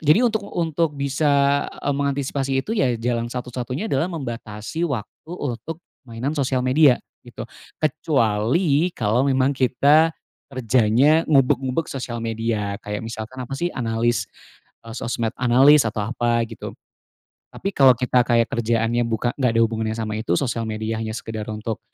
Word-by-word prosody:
jadi 160 - +4
untuk 220 -2 +1
untuk 165 -2 -1
bisa, 140 0 +2
eee, 145 - -3
mengantisipasi 140 -1 -1
itu 220 - -4
ya, 125 - +2
jalan 115 0 -1
satu-satunya 125 - -4
adalah 135 +6 +1
membatasi 120 -1 -5
waktu 130 +2 -6
untuk 140 +5 -5 0.3
mainan 120 +5 -3
sosial 130 -2 0
media 130 0 +5 0.3
gitu, - - -8 0.4
kecuali 145 - +1
kalau 110 +1 +1
memang 130 0 +2
kita 145 +5 +4 0.4
kerjanya 130 +4 +3
ngubek-ngubek 135 +1 +2
sosial 125 -3 -5
media, 110 -3 -2
kayak 105 +1 -5
misalkan 115 +3 -6
apa 125 - -10
sih, 175 - 0
analis 115 0 0 0.6
e 115 - -10
sosmed 115 0 -2
analis 130 +2 +5
atau 105 -1 -2
apa 120 +1 0
gitu. 115 - -8 0.8
Tapi 195 - -3
kalau 135 -6 +6
kita 125 +1 +2
kayak 115 -1 +2
kerjaannya 115 +1 0
buka 115 +1 -1
nggak 130 -3 +2
ada 115 - +5
hubungannya 110 -1 -1
sama 110 -1 -3
itu, 110 -6 -1
sosial 115 -1 -1
media 110 0 -3
hanya 110 -1 -4
sekedar 110 -1 -5
untuk, 110 +1 -4
125 Hz, 145 wpm, -22 LUFS, 115-140 Hz, 0.8 s, kalau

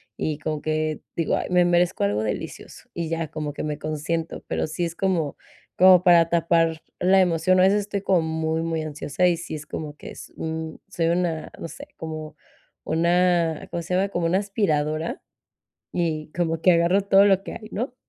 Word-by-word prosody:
y 155 -2 -2
como 155 -1 -3
que, 155 -1 -1 0.2
digo: 165 - +1
"Ay, - - -2
me 180 -1 +4
merezco 175 - +2
algo 105 +2 0
delicioso", 105 - -6
y 170 -2 -3
ya 165 -1 -2
como 150 -2 -4
que - - -6
me 150 -1 -3
consiento, 155 +2 -3
pero - - -1
sí 170 +3 -2
es 170 0 -5
como 175 -7 0 0.4
como 185 -1 +7
para 170 -2 +6
tapar 165 -1 +2 0.2
la 190 +2 +4
emoción, 180 +1 +3
a - - +6
veces 200 +2 +4
estoy 200 -1 -4
como 185 -4 +3
muy, 160 0 -1
muy 165 -1 -2
ansiosa 155 +3 -2
y 170 -2 +2
sí 175 -2 -6
es 155 0 -7
como 150 0 -6
que - - -9
es - - -10
un 160 0 -5
soy 170 -4 -1
una, 170 -2 -1
no - - -5
sé, - - -10
como 155 -1 -6 0.5
una, 170 0 +1
¿cómo 170 - -2
se 180 +2 -2
llama?, 195 +1 +1
como 175 -3 -1
una 180 +3 +2
aspiradora 160 -6 -1 0.7
y 155 -3 -2
como 165 -2 -1
que 185 - +6
agarro 170 +4 +3
todo 195 0 +5
lo 195 -1 +4
que - - -7
hay, 215 -1 -9
¿no? 250 +4 -3
165 Hz, 195 wpm, -24 LUFS, 155-180 Hz, 0.7 s, como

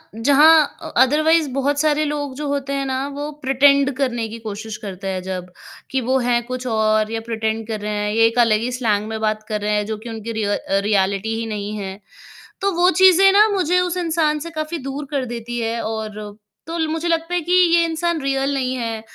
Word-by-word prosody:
जहाँ 295 +6 +6 0.2
अ - - -7
अदरवाइज़ 310 +3 +2
बहुत 285 +1 0
सारे 305 0 +2
लोग 290 -2 -3
जो 295 +1 -4
होते 280 -1 -2
हैं 275 0 -1
ना, 265 +1 -2
वो 290 +1 -5
प्रिटेंड 275 +1 +4
करने 240 -4 -1
की 230 +1 -8
कोशिश 215 +1 -6
करते 195 0 -6
हैं 185 -1 -2
जब, 180 -1 -6 0.4
कि 265 -1 0
वो 260 +3 +1
हैं 240 -1 +2
कुछ 255 0 -5
और 215 -1 +1
या 225 - -2
प्रिटेंड 220 0 -2
कर 220 -2 -3
रहे 210 0 -3
हैं, 210 - -1
ये 225 +1 +4
एक 230 +2 -1
अलग 215 -1 +3
ही 250 - -2
स्लैंग 210 -3 0
में 220 - -4
बात 215 0 -1
कर 210 -1 -2
रहे 210 +1 0
हैं 210 0 0
जो - - -5
कि 235 - -5
उनकी 225 0 -6
रिय 210 - 0
अ, 195 - -1
रियलिटी 200 +2 0
ही 230 - -3
नहीं 205 +1 -4
है। 195 -1 -6 0.6
तो 395 0 +1
वो 365 - +6
चीज़ें 380 +1 +7
ना 420 +2 +6
मुझे 360 0 +2
उस 360 0 -1
इंसान 320 -3 0
से - - -6
काफ़ी 310 +2 -3
दूर 280 +2 -4
कर 275 -3 -1
देती 240 +1 -5
है 230 +1 -2
और 215 -1 -5 0.3
तो 330 +1 -5
ल 320 - +1
मुझे 325 +2 -2
लगता 330 +1 -1
है 355 - +1
कि 345 +3 -3 0.2
ये 340 - +5
इंसान 330 0 -1
रियल 270 0 0
नहीं 255 -1 -1
है, 230 -2 -3
255 Hz, 225 wpm, -20 LUFS, 215-300 Hz, 0.6 s, चीज़ें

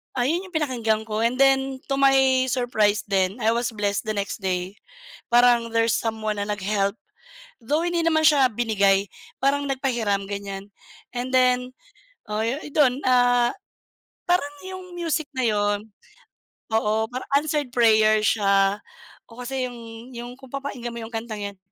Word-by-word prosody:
Ah, 245 - +1
'yon 345 +6 -1
'yong 365 - -17
pinakinggan 235 -8 0
ko 215 0 -2
and 235 +2 +1
then 270 -1 +3
to - - +3
my 265 -1 +4
surprise 220 -5 +1
then, 190 -1 +1
I 220 - +4
was 235 +1 -1
blessed 205 0 -1
the 215 - -1
next 200 +1 -3
day 185 +1 -2 0.5
parang 240 -1 +5
there's 230 -1 +3
someone 215 -2 -2
na 205 - -2
nag-help. 200 0 -1 0.7
Though 295 +7 0
hindi 345 -1 0
naman 315 -1 +3
siya 285 -4 +6
binigay. 200 -3 +2 0.3
Parang 285 +1 +2
nagpahiram, 235 -7 -1
ganyan. 200 0 -6 0.4
And 250 +1 -4
then, 250 0 +2 0.6
oh, 210 +1 -1 0.3
dun, 270 -3 +3
ah, 245 -1 +4 0.8
parang 320 -5 +1
'yong 370 -1 -9
music 325 -3 -1
na 255 - 0
'yon. 205 0 0 0.9
Oo, 220 0 +1
parang 255 +1 -5
answered 295 -2 -1
prayer 215 -2 +4
siya. 195 -2 +3 0.5
Oo, 235 +2 -10
kasi 265 0 -2
'yong 230 +1 -11
yung 240 +1 -7
kung 265 -2 -14
papakinggan 270 -3 -5
mo 235 - -6
'yong 225 - -8
kantang 225 -2 -5
'yan, 200 -1 -7
235 Hz, 150 wpm, -24 LUFS, 210-265 Hz, 0.9 s, siya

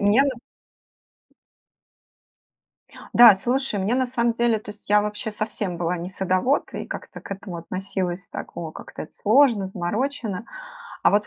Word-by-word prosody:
мне 205 +6 +5
на 280 - +2 2.8
Да, 235 -3 +10
слушай, 245 +2 -1
мне 200 +5 +1
на 260 0 +2
самом 235 -1 +1
деле 235 -1 +2
то 210 - -9
есть 205 0 -13
я 210 0 +5
вообще 210 +1 -3
совсем 210 -4 -3
была 175 +1 -1
не 170 +1 -5
садовод, 190 +8 0
и - - -5
как-то - - -7
к - - -12
этому 190 -3 -6
относилась 185 +1 -4
так: - - -8
"О, 165 -2 -4
как-то - - -8
это 155 - -11
сложно, 225 -3 +4
заморочено". 210 +3 -3 0.6
А - - +6
вот 205 0 +2
205 Hz, 155 wpm, -24 LUFS, 185-235 Hz, 2.8 s, Да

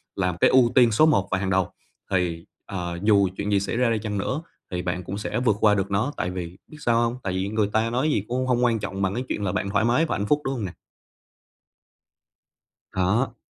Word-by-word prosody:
làm 90 -3 -1
cái - - +4
ưu 125 -2 +5
tiên 120 -3 +6
số 135 +9 +5
một 125 -12 +3
và - - +2
hàng 95 0 -2
đầu 95 -2 +1 0.4
thì, 90 -3 0 0.2
à, 100 - -6 0.3
dù 100 -2 +4
chuyện 100 +1 -2
gì 100 - +4
xảy 100 +4 -3
ra 125 -1 +3
đi 115 -1 +1
chăng 105 -1 -3
nữa 130 +9 -2 0.3
thì 90 -1 -2
bạn 90 0 -3
cũng 95 +3 -5
sẽ 105 - -2
vượt 120 -5 +2
qua 105 -1 +4
được 100 -1 -2
nó, 110 +9 0
tại 90 - -2
vì 90 -1 -6
biết 155 - -13
sao 120 -3 +2
hông? 120 0 0
Tại 95 - -2
vì 95 +1 -1
người 110 -1 +1
ta 110 +1 +2
nói 130 +6 0
gì 105 - 0
cũng 130 +2 -1
hông 125 -1 +2
quan 115 -2 +2
trọng 95 -1 -4
bằng 95 0 +1
cái 125 - -2
chuyện 105 - -2
là 95 - 0
bạn 100 +1 -2
thoải 110 +3 +1
mái 125 +8 +3
và - - -2
hạnh 100 - -2
phúc, 150 +4 +2
đúng 135 - 0
hông 115 -5 -3
nè? 90 - -5 2.2
Đó. 100 +8 0
105 Hz, 250 wpm, -24 LUFS, 95-120 Hz, 2.2 s, tiên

